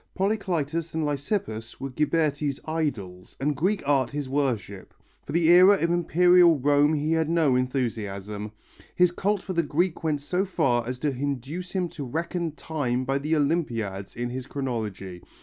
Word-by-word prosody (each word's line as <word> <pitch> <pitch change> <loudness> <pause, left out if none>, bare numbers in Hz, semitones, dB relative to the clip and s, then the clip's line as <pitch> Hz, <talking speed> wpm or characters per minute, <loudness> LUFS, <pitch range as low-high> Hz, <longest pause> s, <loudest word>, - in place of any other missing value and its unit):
Polycletus 170 -6 -1
and 160 -1 0
Lysippus 145 - -3
were 135 0 -5
Ghiberti's 150 -1 0
idols, 115 - -4
and 145 +2 0
Greek 185 +2 -1
art 135 -4 +2
his 145 0 -4
worship; 125 -8 -2 0.3
for - - -8
the 165 -1 +2
era 185 +3 +8
of 170 -3 0
Imperial 175 0 +5
Rome 145 +3 +3
he 150 +1 -1
had 160 -1 +1
no 160 -6 +3
enthusiasm. 105 -5 -3 0.4
His 180 -1 +4
cult 200 +2 -1
for 190 - -4
the 170 - +2
Greek 165 +3 -1
went 155 -2 0
so 180 +6 0
far 125 - 0
as 125 0 -3
to 150 +3 -1
induce 140 +6 -4
him 185 -2 0
to 145 - -7
reckon 165 +4 -3
time 130 -6 -2
by 135 +2 0
the 155 +3 0
Olympiads 115 - -1
in 120 +1 -3
his 130 0 -5
chronology. 105 -9 -4
145 Hz, 165 wpm, -26 LUFS, 125-170 Hz, 0.4 s, era